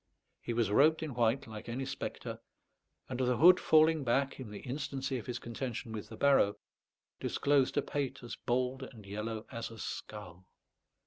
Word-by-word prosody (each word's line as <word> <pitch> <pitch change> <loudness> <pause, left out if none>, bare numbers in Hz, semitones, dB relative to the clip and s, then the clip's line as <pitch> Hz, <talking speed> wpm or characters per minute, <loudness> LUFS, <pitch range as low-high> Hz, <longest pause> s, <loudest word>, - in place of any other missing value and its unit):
He 120 - -3
was 115 -3 +1
robed 155 +8 +5
in 155 -4 -4
white 120 +3 +2
like 110 0 -8
any 130 +3 -2
spectre, - - -5 0.7
and 130 -1 -4
the 125 -1 +2
hood 180 +3 +8
falling 155 -1 +5
back, 135 +3 +1
in 125 -5 -6
the 105 - -8
instancy 135 0 -3
of 110 - -10
his 125 -1 -2
contention 120 -1 -5
with 105 -1 -6
the 110 - -9
barrow, 135 -7 +4 0.6
disclosed 140 -2 +2
a 145 - +3
pate 140 -4 -3
as 120 - -6
bald 125 +2 -1
and 115 -5 -10
yellow 110 +3 -4
as 115 -2 -4
a 115 - -11
skull. 95 -4 -7
125 Hz, 175 wpm, -33 LUFS, 110-140 Hz, 0.7 s, hood